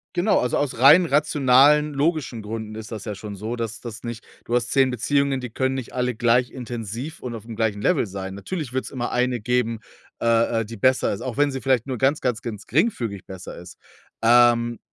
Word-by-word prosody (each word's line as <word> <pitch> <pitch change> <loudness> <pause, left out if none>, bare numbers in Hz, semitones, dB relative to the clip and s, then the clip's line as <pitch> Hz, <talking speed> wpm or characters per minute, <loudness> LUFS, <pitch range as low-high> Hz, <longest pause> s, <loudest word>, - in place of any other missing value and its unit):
genau, 185 +5 +3
also, 125 - 0
aus 140 -5 -2
rein 150 +8 +8
rationalen, 150 0 +4
logischen 140 -5 -1
Gründen 110 0 -6
ist 110 0 -8
das 110 -4 -6
ja 105 -3 -5
schon 100 0 -8
so, 110 +5 -5
dass 115 -1 -4
das 115 -1 -8
nicht 120 -1 -6 0.2
du 120 - -1
hast 120 0 0
10 135 -1 +4
Beziehungen, 135 +2 0
die 125 - -5
können 130 +3 -1
nicht 130 -3 -6
alle 125 -2 -1
gleich 120 +2 +2
intensiv 120 +3 -6
und 120 -2 -6
auf'm 110 0 -9
gleichen 105 -2 0
Level - - +2
sein. 95 0 -6
Natürlich 130 - -5
wird 130 0 -2
es - - -8
immer 120 -2 -3
eine 125 -2 0
geben, 115 -1 0 0.4
äh, 115 0 +2
äh, - - -4
die 115 0 -9
besser 130 +5 +2
ist, 100 - -5
auch 125 -3 -5
wenn 145 0 +2
sie 135 - -4
vielleicht 130 -3 +1
nur 130 -3 -4
ganz, 135 +4 +1
ganz, 125 -4 -1
ganz 110 -4 -7
geringfügig 120 - -1
besser 95 -1 -9
ist. 90 +1 -11 0.5
Ähm 120 0 +4
120 Hz, 215 wpm, -23 LUFS, 110-130 Hz, 0.5 s, rein